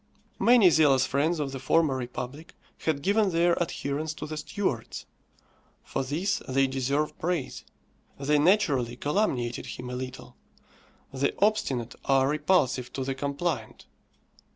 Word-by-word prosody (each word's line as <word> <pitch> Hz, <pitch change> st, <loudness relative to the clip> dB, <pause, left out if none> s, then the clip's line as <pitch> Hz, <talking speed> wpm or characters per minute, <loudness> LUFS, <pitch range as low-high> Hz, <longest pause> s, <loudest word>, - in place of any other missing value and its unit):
Many 235 Hz, -7 st, +6 dB
zealous 140 Hz, -5 st, +4 dB
friends 150 Hz, +6 st, 0 dB
of 140 Hz, -2 st, -2 dB
the 135 Hz, -, -5 dB
former 150 Hz, +1 st, +2 dB
republic 130 Hz, +4 st, -6 dB, 0.3 s
had 150 Hz, -3 st, 0 dB
given 205 Hz, +1 st, +3 dB
their 170 Hz, 0 st, +3 dB
adherence 155 Hz, -1 st, -3 dB
to -, -, -6 dB
the 155 Hz, -, -5 dB
Stuarts. 150 Hz, -, -3 dB, 0.8 s
For -, -, -3 dB
this 170 Hz, +9 st, -1 dB
they 135 Hz, +1 st, +3 dB
deserve 135 Hz, +3 st, -1 dB
praise. 170 Hz, -5 st, -2 dB, 0.6 s
They 145 Hz, +2 st, +2 dB
naturally 145 Hz, -, +2 dB
calumniated 130 Hz, -, -1 dB
him 125 Hz, 0 st, -7 dB
a -, -, -4 dB
little. 130 Hz, 0 st, -7 dB, 0.8 s
The 135 Hz, +1 st, 0 dB
obstinate 135 Hz, -, +1 dB
are 135 Hz, -1 st, +3 dB
repulsive 145 Hz, -5 st, +1 dB
to 135 Hz, -, -3 dB
the 135 Hz, +1 st, -2 dB
compliant. 140 Hz, -3 st, -3 dB
140 Hz, 130 wpm, -27 LUFS, 130-165 Hz, 0.8 s, Many